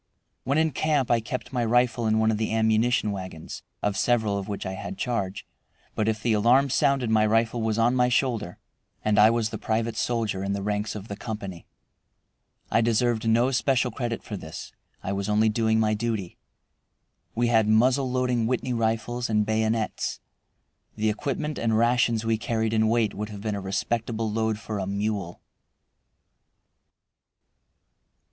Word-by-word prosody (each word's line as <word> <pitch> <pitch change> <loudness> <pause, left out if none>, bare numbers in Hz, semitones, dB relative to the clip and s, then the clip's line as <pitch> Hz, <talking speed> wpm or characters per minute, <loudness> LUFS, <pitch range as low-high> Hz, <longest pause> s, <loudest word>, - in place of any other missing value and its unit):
When 140 +3 +1
in 160 0 +2
camp 145 -2 0
I 120 - +4
kept 125 +4 -6
my 120 -2 0
rifle 120 0 +2
in 110 0 +2
one 110 0 +3
of 105 - -2
the 110 - -1
ammunition 110 0 +2
wagons 95 -5 -7 0.2
(of 105 -1 0
several 110 0 +1
of 100 -1 -3
which 100 -1 -4
I 95 - -3
had 185 - -6
charge), 110 - -2 0.5
but 110 - -1
if 110 0 -1
the 115 - +2
alarm 120 +6 +4
sounded 135 -5 +2
my 110 -1 +4
rifle 115 +2 +1
was 110 -1 0
on 115 +2 +3
my 125 -1 +3
shoulder 120 -7 0 0.5
and 105 -1 +3
I 105 +1 +8
was 115 -1 0
the - - -5
private 115 +1 -1
soldier 110 -5 -1
in 100 0 -1
the 100 -1 -3
ranks 105 +1 -2
of 105 0 -7
the 100 - -5
company. 100 -5 -7 1.0
I 115 - +4
deserved 115 0 +1
no 120 +4 +3
special 130 -1 +1
credit 120 0 -4
for 105 - -6
this. 80 -4 -8 0.3
I 95 - -3
was 100 +1 -3
only 110 +1 +3
doing 110 0 +1
my 110 -1 +2
duty. 105 -4 -3 1.0
We 120 +1 +1
had 110 -2 +3
muzzle 125 +5 +3
loading 125 -2 0
Whitney 125 +1 -1
rifles 115 +1 -1
and 105 -1 +2
bayonets. 110 0 -1 0.8
The 110 0 +1
equipment 145 +6 -3
and 110 -1 +1
rations 115 -1 +2
we 115 -1 +1
carried 110 -1 -1
in 110 0 +3
weight 115 -2 +1
would 105 +1 -5
have 105 -2 -8
been 105 0 -2
a 100 - -3
respectable 110 +3 -2
load 110 0 0
for 110 -1 -5
a 95 - -3
mule. 100 -3 -3
110 Hz, 170 wpm, -26 LUFS, 105-120 Hz, 1.0 s, I